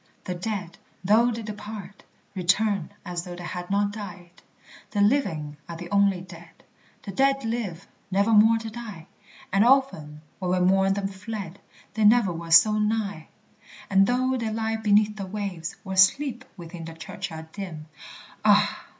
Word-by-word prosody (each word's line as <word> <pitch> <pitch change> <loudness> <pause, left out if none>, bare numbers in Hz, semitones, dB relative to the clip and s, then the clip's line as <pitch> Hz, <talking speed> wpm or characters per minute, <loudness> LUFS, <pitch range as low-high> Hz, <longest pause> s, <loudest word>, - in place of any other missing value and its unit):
The 180 - -3
dead, 180 -1 -5 0.2
though 220 +5 +4
they 230 -1 -4
depart, 210 -2 -8 0.3
return 195 0 +1 0.2
As 175 -1 -4
though 175 -1 -8
they 175 - -9
had 175 0 -6
not 200 +1 +1
died! 180 -4 -10 0.5
The 205 - -3
living 185 - +1
are 170 - -5
the 175 +2 -9
only 200 -2 +3
dead; 170 -2 -14 0.4
The 200 - -6
dead 275 +4 +2
live, 225 -7 -3 0.2
nevermore 215 +3 +5
to 225 0 -6
die; 215 -8 -8 0.5
And 195 +1 +5
often, 235 - +2 0.2
when 185 -2 -2
we 185 0 +2
mourn 195 0 +3
them 195 0 -2
fled, 195 -1 -7 0.3
They 220 - -1
never 210 -3 +5
were 165 0 -7
so 215 +6 +6
nigh! 210 -6 -1 0.6
And 195 0 +5
though 255 +2 +1
they 230 -2 -2
lie 220 0 -1
beneath 210 0 +3
the 195 -2 -5
waves, 190 -4 -5
Or 190 -1 -4
sleep 245 +7 +3
within 170 -1 -8
the 165 0 -8
churchyard 160 0 -7
dim, 170 -6 -7 0.6
(Ah! - - +3
200 Hz, 160 wpm, -25 LUFS, 175-220 Hz, 0.6 s, so